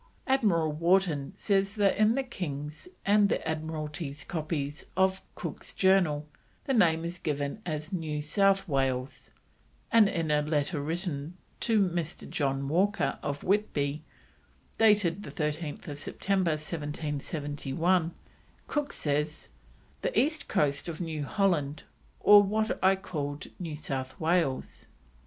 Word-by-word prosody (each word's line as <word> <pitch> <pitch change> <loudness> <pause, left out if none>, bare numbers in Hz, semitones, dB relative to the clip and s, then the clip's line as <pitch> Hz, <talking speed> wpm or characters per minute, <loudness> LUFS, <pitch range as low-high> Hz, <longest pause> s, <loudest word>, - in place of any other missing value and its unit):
Admiral 205 - +2
Wharton 165 -3 +2
says 195 0 +1
that 200 -2 +3
in 215 +2 +4
the 275 - +1
King's 150 - -5 0.2
and 205 0 +5
the - - -1
Admiralty's 155 -2 -4
copies 150 -3 -3
of 190 0 +3
Cook's - - -6
Journal 180 -6 +3 0.4
the 270 - 0
name 165 -7 +3
is 170 +1 -5
given 145 +4 -2
as 155 +2 -4
New 155 -4 -2
South 195 +6 +2
Wales, 135 -2 -1 0.6
and 220 -3 +6
in 165 -4 -1
a 150 0 +3
letter 150 0 0
written 165 0 -3 0.2
to 225 -2 +2
Mr. 170 -2 -4
John 135 -2 -1
Walker, 180 -1 +1
of 145 0 -3
Whitby, 155 -8 0 0.8
dated 205 -5 +4
13th 150 -4 -4
September 185 +3 0
1771, 150 +2 -1 0.5
Cook 295 -1 -2
says: 150 +1 -1 0.5
"The - - +1
East 310 +3 0
coast 145 -4 +1
of 160 - -5
New 160 -4 -3
Holland, 165 -7 0 0.4
or 205 0 +8
what 215 +2 -1
I 190 +1 +6
call 150 -7 -4 0.2
New 165 -4 -4
South 135 -3 -5
Wales." 160 -5 0
160 Hz, 125 wpm, -29 LUFS, 145-195 Hz, 0.8 s, or